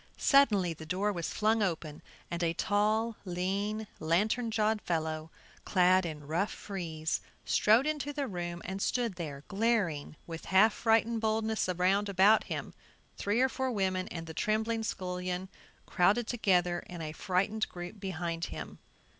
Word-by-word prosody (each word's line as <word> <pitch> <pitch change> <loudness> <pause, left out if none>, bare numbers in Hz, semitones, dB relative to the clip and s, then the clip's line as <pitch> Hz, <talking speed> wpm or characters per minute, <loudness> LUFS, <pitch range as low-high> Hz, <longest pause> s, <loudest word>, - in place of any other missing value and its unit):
Suddenly 210 - +4
the 160 0 -10
door 195 +4 0
was 170 -3 -3
flung 220 +1 +2
open 160 -6 -2 0.3
and 170 0 -2
a 165 -1 +1
tall, 215 +4 +1
lean, 200 +4 -2
lantern 210 +9 +1
jawed 215 -1 +1
fellow, 160 -1 -2 0.3
clad 185 -1 +4
in 150 -2 -7
rough 170 +7 0
frieze, 165 -5 -3 0.2
strode 225 +5 +4
into 295 -2 -1
the 285 -2 -2
room 175 -4 -5
and 190 +1 -4
stood 235 -2 0
there 150 -6 -6
glaring 195 -9 0
with 165 -1 -7
half 200 +3 +5
frightened 225 +1 +2
boldness 220 -2 0
around 190 +3 +2
about 200 +3 +5
him; - - -5 0.4
three 210 +4 0
or 260 - +5
four 260 0 -2
women 190 -4 0
and 165 -1 -6
the 160 - -8
trembling 220 +5 0
scullion 180 -2 -3 0.4
crowded 205 +6 +3
together 180 -7 +2
in 175 -2 -7
a 155 - -4
frightened 195 +6 0
group 175 +4 -8
behind 170 -3 -3
him. - - -7
190 Hz, 150 wpm, -31 LUFS, 175-220 Hz, 0.4 s, half